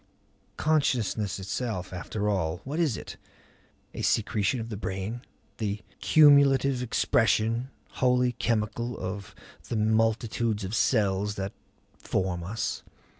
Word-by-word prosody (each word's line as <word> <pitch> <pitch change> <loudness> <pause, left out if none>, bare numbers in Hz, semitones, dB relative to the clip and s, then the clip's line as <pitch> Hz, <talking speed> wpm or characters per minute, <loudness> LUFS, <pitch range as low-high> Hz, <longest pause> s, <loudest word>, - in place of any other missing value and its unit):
Consciousness 120 -10 +1
itself 95 -1 -4
after 105 +3 -3
all 85 -5 0
what 145 +5 -4
is 150 -10 +1
it? - - -8 0.8
A - - -5
secretion 110 +2 +1
of 115 0 -5
the 110 - -4
brain? 100 +4 -4 0.4
The 105 -1 -2 0.2
cumulative 140 -3 +5
expression, 115 0 +1 0.3
wholly 125 -1 +3
chemical, 115 0 -1
of 95 +1 -6 0.3
the 115 - -1
multitudes 110 0 +1
of 95 +2 -4
cells 105 -3 +1
that 95 0 -4 0.5
form 90 -2 -1
us? 105 +5 -3
110 Hz, 115 wpm, -27 LUFS, 100-125 Hz, 0.8 s, cumulative